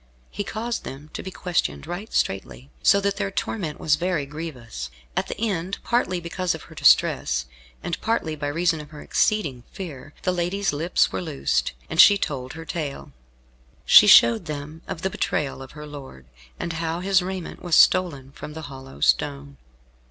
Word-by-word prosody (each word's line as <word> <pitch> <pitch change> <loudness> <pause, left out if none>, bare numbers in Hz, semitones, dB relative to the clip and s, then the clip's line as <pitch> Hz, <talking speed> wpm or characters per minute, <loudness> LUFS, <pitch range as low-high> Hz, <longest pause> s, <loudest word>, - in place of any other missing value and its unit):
He 205 - -3
caused 225 +3 -3
them 145 +3 -9
to - - -5
be 190 - -6
questioned 180 -4 -2
right 175 +6 -6
straitly, 65 -8 -2
so 200 - +5
that 200 0 0
their 200 -1 -1
torment 185 -5 -3
was 150 -2 +2
very 175 -3 -1
grievous. 130 - -7 0.3
At - - 0
the - - -6
end, 195 -4 -1
partly 210 -7 +1
because 175 +1 -2
of 160 - -10
her - - -14
distress, 65 0 +3 0.4
and 170 - -3
partly 195 -9 0
by 145 -1 -4
reason 165 +1 +1
of 150 - -12
her 150 -1 -10
exceeding 155 - 0
fear, 145 -7 -8
the 185 - +2
lady's 180 +1 -1
lips 165 +5 +2
were - - -3
loosed, 155 -6 -1
and 160 - +6
she 205 - +8
told 130 -8 -4
her 165 0 -8
tale. 150 - -5 0.7
She - - +9
showed 115 -1 +7
them 150 +2 -6
of 165 - -6
the 190 - 0
betrayal 140 -6 -2
of 135 - -10
her 150 0 -9
lord, 135 - -10 0.3
and 170 -1 -3
how 165 +1 -2
his 190 0 +3
raiment 185 -1 -5
was 175 -3 +1
stolen 145 -8 +4
from 150 - -9
the 160 - -7
hollow 130 - -11
stone. 70 -1 +1
160 Hz, 180 wpm, -24 LUFS, 140-185 Hz, 0.7 s, She